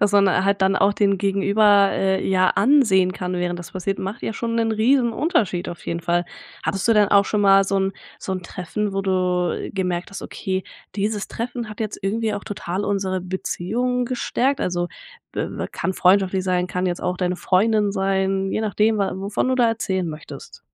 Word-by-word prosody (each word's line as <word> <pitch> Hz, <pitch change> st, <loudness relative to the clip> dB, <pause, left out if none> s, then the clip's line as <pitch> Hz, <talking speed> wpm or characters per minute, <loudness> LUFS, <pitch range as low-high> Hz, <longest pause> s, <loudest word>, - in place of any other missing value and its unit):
dass 205 Hz, -1 st, +2 dB
man 195 Hz, -2 st, +4 dB
halt 200 Hz, 0 st, +1 dB
dann 190 Hz, 0 st, +3 dB
auch 195 Hz, +1 st, +3 dB
den 200 Hz, -1 st, +2 dB
Gegenüber, 200 Hz, +1 st, +4 dB
äh, 190 Hz, 0 st, 0 dB
ja 185 Hz, -1 st, +3 dB
ansehen 200 Hz, -7 st, +4 dB
kann 180 Hz, -1 st, -4 dB
während 175 Hz, 0 st, -2 dB
das 175 Hz, -, -9 dB
passiert, 190 Hz, +1 st, -3 dB
macht 195 Hz, +4 st, -5 dB
ja -, -, -2 dB
schon 230 Hz, +1 st, -3 dB
'nen 225 Hz, -1 st, +1 dB
Riesenunterschied, 235 Hz, -, +1 dB
auf 175 Hz, -, -8 dB
jeden 170 Hz, 0 st, -2 dB
Fall. 175 Hz, +1 st, 0 dB, 0.4 s
Hattest 195 Hz, +3 st, -1 dB
du -, -, +6 dB
dann 210 Hz, -2 st, +4 dB
auch 200 Hz, 0 st, +5 dB
schon 210 Hz, -, -1 dB
mal 195 Hz, -1 st, +6 dB
so 195 Hz, 0 st, -1 dB
'n 195 Hz, 0 st, 0 dB, 0.3 s
so 190 Hz, -, -4 dB
'n 185 Hz, -1 st, -4 dB
Treffen, 195 Hz, +4 st, -4 dB
wo 195 Hz, -, -1 dB
du 180 Hz, -2 st, 0 dB
gemerkt 180 Hz, -2 st, -2 dB
hast: 195 Hz, -, -7 dB
„Okay 190 Hz, -1 st, -4 dB, 0.3 s
dieses 205 Hz, 0 st, -1 dB
Treffen 235 Hz, -1 st, -5 dB
hat 215 Hz, +1 st, -10 dB
jetzt 215 Hz, -1 st, -3 dB
irgendwie 215 Hz, +2 st, -1 dB
auch 205 Hz, -, -6 dB
total 190 Hz, -1 st, -4 dB
unsere 190 Hz, -2 st, -1 dB
Beziehung 220 Hz, +7 st, -2 dB
gestärkt“, 255 Hz, +2 st, -1 dB
also, 175 Hz, -1 st, -1 dB, 0.4 s
b -, -, -2 dB, 0.3 s
kann 190 Hz, -, -2 dB
freundschaftlich 190 Hz, 0 st, +3 dB
sein, 180 Hz, -1 st, +1 dB
kann 180 Hz, 0 st, -2 dB
jetzt 175 Hz, -1 st, -2 dB
auch 180 Hz, -, -1 dB
deine 180 Hz, 0 st, -1 dB
Freundin 210 Hz, +2 st, +2 dB
sein, 195 Hz, 0 st, 0 dB
je -, -, -1 dB
nachdem 215 Hz, 0 st, +1 dB
wa 200 Hz, -1 st, 0 dB
wovon 200 Hz, +6 st, -2 dB
du 260 Hz, -, +2 dB
da 245 Hz, -2 st, +3 dB
erzählen 190 Hz, -5 st, -1 dB
möchtest. 155 Hz, -1 st, -10 dB
195 Hz, 195 wpm, -22 LUFS, 185-215 Hz, 0.4 s, du